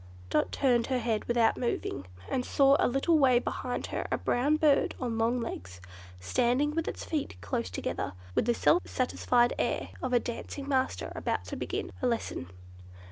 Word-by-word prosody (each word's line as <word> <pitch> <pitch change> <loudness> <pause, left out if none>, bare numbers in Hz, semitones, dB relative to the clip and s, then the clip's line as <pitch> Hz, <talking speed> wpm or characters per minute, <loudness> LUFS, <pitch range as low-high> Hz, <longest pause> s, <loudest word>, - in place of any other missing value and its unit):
Dot 150 - +2
turned 245 -4 +2
her 260 - +1
head 225 -3 -1
without 235 -2 +3
moving, 235 - -2 0.2
and 255 - -1
saw 275 +1 +4
a - - +4
little 275 +6 +2
way 260 -3 +5
behind 250 0 -2
her - - -2
a - - +2
brown 280 +5 +2
bird 305 -2 +3
on 235 -3 -2
long 235 +2 +2
legs, 95 - -6 0.4
standing 240 - +1
with 330 0 -1
its - - -4
feet 295 - -3
close 90 +4 -2
together, 90 +1 -3 0.2
with - - +1
the 240 0 +2
self 350 - +4
satisfied 245 -1 +2
air - - -1
of 255 - -2
a 245 - +5
dancing 275 +4 -6
master 265 -2 0
about - - -2
to - - -5
begin - - -3
a 255 - +2
lesson. 230 - -2
245 Hz, 180 wpm, -29 LUFS, 230-275 Hz, 0.4 s, way